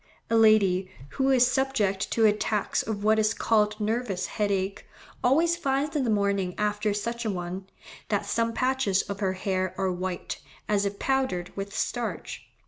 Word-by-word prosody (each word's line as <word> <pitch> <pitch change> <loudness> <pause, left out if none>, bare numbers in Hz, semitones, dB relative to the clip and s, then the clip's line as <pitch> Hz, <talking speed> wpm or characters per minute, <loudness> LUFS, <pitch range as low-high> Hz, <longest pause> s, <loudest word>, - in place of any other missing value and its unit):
A - - +4
lady 200 -4 +4 0.2
"who 265 - 0
is 255 -2 +5
subject 250 -7 0
to 225 - +3
attacks 210 0 +1
of 205 -2 -4
what 220 +1 +4
is 215 0 +2
called 210 -1 +2
nervous 210 -4 -1
headache, 200 -2 -2 0.4
always 325 +7 +4
finds 285 -1 -1
in 290 - +1
the - - 0
morning 200 -3 +1
after 210 0 0
such 235 +3 -3
an 215 -4 -1
one, 180 +2 -5 0.4
that - - 0
some 230 0 0
patches 255 -5 +1
of 200 -1 -6
her 190 -2 0
hair 185 -1 -2
are 190 -1 0
white, 180 0 -4 0.3
as 205 -1 +2
if 200 0 -5
powdered 260 -11 -1
with 200 0 -5
starch. 240 -1 -3
210 Hz, 165 wpm, -27 LUFS, 195-235 Hz, 0.4 s, is